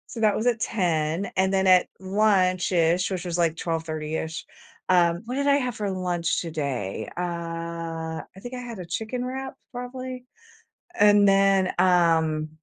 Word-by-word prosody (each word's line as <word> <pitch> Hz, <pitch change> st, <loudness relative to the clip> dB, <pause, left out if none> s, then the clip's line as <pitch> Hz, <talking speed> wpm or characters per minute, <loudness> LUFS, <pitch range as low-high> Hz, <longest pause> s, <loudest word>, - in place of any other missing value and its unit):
So, 230 Hz, -, -6 dB
that 215 Hz, -2 st, +3 dB
was 220 Hz, -, -2 dB
at 240 Hz, -2 st, +2 dB
10:00. 170 Hz, -4 st, -1 dB
And, 190 Hz, +1 st, +2 dB
then, 190 Hz, 0 st, +2 dB
at 185 Hz, -1 st, +6 dB
lunch-ish, 185 Hz, -3 st, +2 dB
which 185 Hz, -3 st, -3 dB
was, 175 Hz, -2 st, -3 dB
like, 165 Hz, -2 st, +2 dB
twelve 165 Hz, -1 st, -3 dB
thirty-ish 155 Hz, 0 st, -4 dB, 0.4 s
um, 175 Hz, -1 st, +3 dB
what 245 Hz, +3 st, -4 dB
did 280 Hz, +1 st, 0 dB
I 280 Hz, -, +5 dB
have 250 Hz, -4 st, -1 dB
for 205 Hz, -2 st, -2 dB
lunch 180 Hz, -3 st, -1 dB
today? 140 Hz, -, -3 dB
Uh, -, -, -1 dB, 1.1 s
I 190 Hz, -, -16 dB
think 245 Hz, +3 st, -8 dB
I -, -, -5 dB
had 240 Hz, -3 st, -7 dB
a 180 Hz, -, -7 dB
chicken 220 Hz, +8 st, -3 dB
wrap, 265 Hz, +1 st, -5 dB, 0.2 s
probably? 250 Hz, 0 st, -6 dB, 0.7 s
And 205 Hz, -1 st, +6 dB
then, 195 Hz, -1 st, +4 dB
um, 165 Hz, -4 st, +3 dB
185 Hz, 160 wpm, -25 LUFS, 170-220 Hz, 1.1 s, at